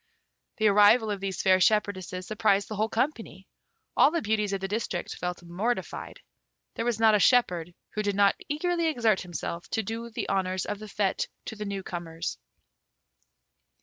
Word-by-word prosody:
The 220 - 0
arrival 210 +2 +5
of 200 - -3
these 195 -2 -3
fair 185 -1 +5
shepherdesses 185 -2 +1
surprised 205 -1 +1
the 215 - -5
whole 215 +2 0
company. 225 -5 -2 0.5
All - - +6
the 335 +2 0
beauties 210 -1 0
of 195 - -1
the 195 - -3
district 200 -4 -3
felt 180 0 -5
mortified. 195 +8 -3 0.5
There 230 - -3
was 240 -2 0
not 220 -1 +5
a 210 - +4
shepherd 180 -8 +3 0.2
who 215 - -2
did 205 -1 -1
not 200 0 +5 0.2
eagerly 335 +3 0
exert 230 -9 +2
himself 175 -1 -5
to 220 - -1
do 230 +3 -5
the 230 - -4
honours 185 -1 0
of 205 -1 -4
the 215 - -8
fête 200 -1 -1 0.2
to - - -6
the 210 0 -5
new 200 -1 -4
comers. 170 -1 -5
205 Hz, 175 wpm, -27 LUFS, 190-220 Hz, 0.5 s, All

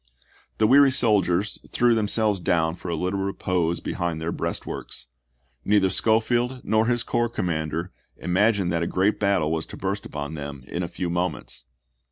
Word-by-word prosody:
The 110 - +3
weary 140 +4 +7
soldiers 105 -6 +1
threw 120 -1 +3
themselves 105 -2 +1
ibid., - - -14
p. - - +2
86. - - +3
down 80 0 0
for 90 - -7
a 85 - -1
little 90 +4 -1
repose 90 -3 -1
behind 85 -2 -2
their 80 +1 -2
breastworks; - - -5 0.6
neither 100 -2 +3
Schofield 120 +3 +1
nor 110 +1 +2
his 120 -1 +1
corps 120 -1 0
commanders 85 -4 -2 0.3
im 90 - -4
agined 100 -2 +3
that 85 -1 0
a 85 - 0
great 95 +5 +1
battle 100 -7 +2
was 80 0 -2
to - - -9
burst 100 +1 -3
upon 75 0 -5
them 70 -3 -7
in 85 - -4
a 85 - -2
few 90 0 -4
moments. 90 +1 -3
95 Hz, 185 wpm, -24 LUFS, 85-110 Hz, 0.6 s, weary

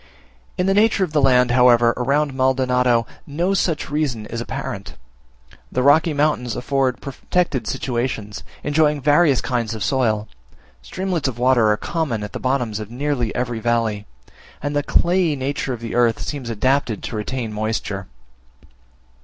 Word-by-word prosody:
In 180 - +1
the 195 - +3
nature 210 0 +3
of 170 -4 -3
the 150 - +3
land, 125 -2 +4
however, 120 -1 +5
around 140 +3 0
Maldonado, 125 -2 +2 0.2
no 170 +6 0
such 165 -7 -1
reason 140 -8 -1
is 115 +2 -5
apparent; 105 - -6 0.8
the 125 - 0
rocky 155 +4 +5
mountains 145 -5 0
afford 130 0 0
protected 140 -2 -2
situations; 120 -5 -3 0.2
enjoying 150 0 +2
various 145 0 +3
kinds 115 -3 -2
of 110 - -4
soil; 110 -5 0 0.5
streamlets 180 - -2
of 125 -3 -4
water 125 -3 +3
are 105 - +2
common 140 -10 -2
at 105 - -7
the - - -4
bottoms 125 -5 -1
of 105 -1 -7
nearly 125 -1 -1
every 120 -2 -2
valley; 110 -2 -1 0.5
and 145 +1 -3
the 145 - +2
clayey 170 +2 +2
nature 135 0 -3
of 120 -2 -5
the 115 - -5
earth 120 -2 +2
seems 135 -5 -5
adapted 120 0 0
to - - -5
retain 110 +1 -3
moisture. 105 -2 -3
130 Hz, 155 wpm, -21 LUFS, 115-145 Hz, 0.8 s, however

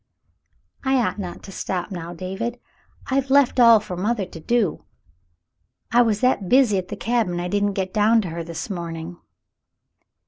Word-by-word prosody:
"I 265 0 +2
ought 210 -6 0
not 180 -3 -6
to 195 - -10
stop 185 0 -4
now, 170 -2 -6
David. 190 +7 -5 0.5
I've 270 0 +1
left 275 -2 +4
all 230 -2 +8
for 205 -3 -7
mother 205 +3 -1
to 165 - -11
do. 225 +1 0 1.1
I 240 +1 +5
was 220 -3 +1
that 230 -7 +1
busy 245 -7 +4
at 180 - -6
the 205 - -5
cabin 220 -6 0
I 175 - -2
didn't 205 +1 0
get 190 -1 -3
down 220 +2 +4
to 180 - -5
her 165 +1 -5
this 165 0 -6
morning." 170 -2 -6
200 Hz, 170 wpm, -22 LUFS, 180-235 Hz, 1.1 s, all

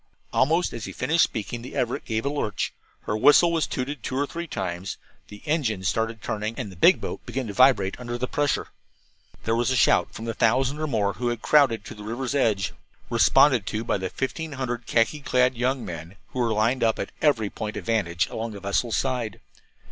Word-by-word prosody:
Almost 165 +7 +2
as 115 -3 -5
he - - -7
finished 160 +6 +2
speaking 115 +2 -3
the 125 - -9
Everett 125 -3 -1
gave 110 0 -2
a - - +1
lurch, 110 -8 -2 0.3
her 105 - -2
whistle 145 +9 +6
was 165 -3 +1
tooted 135 +1 -4
two 130 - -3
or 145 - +2
three 170 +4 -6
times, 90 - -4 0.3
the 105 0 -12
engines 120 - 0
started 115 0 -1
turning, 110 +1 -3
and 100 - -4
the - - -12
big 90 - +5
boat - - -5
began 130 -1 -4
to 105 - -5
vibrate 125 -6 +4
under 120 -1 -4
the 125 - -1
pressure. 145 +1 0 0.7
There 115 - +1
was 120 +2 +1
a 130 - +1
shout 115 - +3
from 115 - -8
the 115 - -2
thousand 130 +6 +2
or 155 - -1
more 105 -7 0
who 125 - -3
had 120 -1 -2
crowded 130 -8 +4
to - - -7
the 105 - -11
river's 120 +5 -3
edge, 105 -9 +1 0.4
responded 125 -9 +5
to 110 +1 -2
by 105 - 0
the 95 0 -3
fifteen 155 - -4
hundred 120 -3 -4
khaki 115 +6 +2
clad 125 -2 +2
young 125 +2 -1
men 85 +2 -7
who 130 - -5
were 120 -2 +1
lined 110 +4 +1
up 115 -1 +2
at - - -4
every 115 -9 +2
point 105 -1 -5
of - - -6
vantage 90 -7 +1
along 115 0 -5
the 100 - -8
vessel's 100 +4 0
side. 125 -6 -2
120 Hz, 215 wpm, -25 LUFS, 105-135 Hz, 0.7 s, whistle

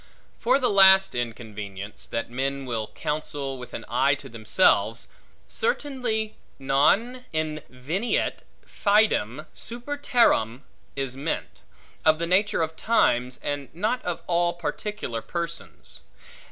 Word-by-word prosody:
For 250 +3 +4
the 255 -5 +1
last 190 -1 +7
inconvenience, 105 -4 -5
that 115 0 -3
men 135 +2 -2
will 115 -4 -2
counsel, 145 -3 -4
with 125 - -8
an - - -6
eye 130 +4 +3
to 140 -1 -11
themselves; 115 - +2 0.4
certainly, 250 - -1 0.2
non 195 - +2
inveniet 155 - -2 0.3
fidem 200 - +2
super 245 +5 -5
terram 140 - +3 0.3
is 135 -2 -3
meant, 145 +4 -4 0.4
of 155 0 +5
the 170 - -1
nature 190 +1 +2
of 160 0 -3
times, 125 - +2
and 145 -1 -3
not 220 +8 0
of 175 -2 -3
all 175 0 +2
particular 175 - -4
persons. 170 +3 -5
155 Hz, 115 wpm, -26 LUFS, 125-210 Hz, 0.4 s, last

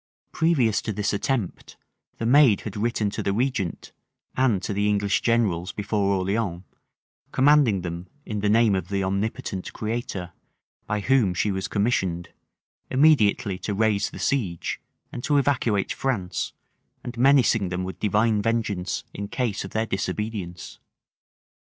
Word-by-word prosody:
Previous 145 -10 +2
to - - -3
this 105 0 -1
attempt, 105 -2 -2 0.4
the 115 - -3
maid 125 -4 +5
had 105 - -7
written 110 -1 0
to - - -3
the - - 0
regent, 115 -6 -2 0.4
and 125 -7 +2
to 105 - -2
the 105 +1 +1
English 100 -1 +1
generals 100 -7 +1
before 100 -1 0
Orleans, 95 -1 -1 0.7
commanding 135 -7 +4
them, 85 +1 -5 0.2
in 105 -1 -3
the 105 0 +1
name 110 0 +4
of 95 - -1
the 100 -1 -1
omnipotent 100 0 -3
Creator, 105 -5 -4 0.5
by 105 0 -1
whom 115 -6 +2
she 105 +4 +1
was 95 -1 -2
commissioned, 95 -5 0 0.6
immediately 115 -9 +3
to 105 - -3
raise 105 -1 +1
the - - -10
siege; 105 -11 -1 0.3
and 120 - -7
to 145 - +2
evacuate 130 -8 +1
France; 105 -10 -2 0.5
and 120 -1 -6
menacing 120 -6 +4
them 90 0 -2
with 90 -1 -6
divine 105 +1 +2
vengeance 105 -5 -1
in 100 - -5
case 115 -2 -2
of 95 - -7
their 110 +3 -1
disobedience. 95 -3 -4
105 Hz, 145 wpm, -25 LUFS, 95-120 Hz, 0.7 s, maid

